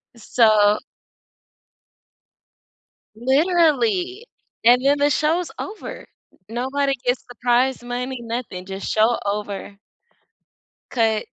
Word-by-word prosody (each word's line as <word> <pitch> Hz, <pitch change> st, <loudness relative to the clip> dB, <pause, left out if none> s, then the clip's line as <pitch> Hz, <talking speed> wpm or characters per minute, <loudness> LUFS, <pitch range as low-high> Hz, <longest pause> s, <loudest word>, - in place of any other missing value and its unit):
So 215 Hz, -3 st, +4 dB, 2.4 s
Literally, 355 Hz, -, +2 dB, 0.4 s
and 245 Hz, +2 st, +6 dB
then 285 Hz, +1 st, +4 dB
the 290 Hz, 0 st, +3 dB
show's 320 Hz, +5 st, +1 dB
over. 415 Hz, +2 st, -7 dB, 0.4 s
Nobody 270 Hz, +4 st, -1 dB
gets 245 Hz, +1 st, 0 dB
the 245 Hz, -, -11 dB
prize 245 Hz, +1 st, +2 dB
money, 245 Hz, +1 st, -4 dB
nothing, 230 Hz, -6 st, -5 dB
just 195 Hz, 0 st, -5 dB
show 220 Hz, +2 st, +3 dB
over. 200 Hz, -1 st, -4 dB, 1.1 s
Cut. 225 Hz, -3 st, +1 dB
245 Hz, 90 wpm, -22 LUFS, 220-290 Hz, 2.4 s, and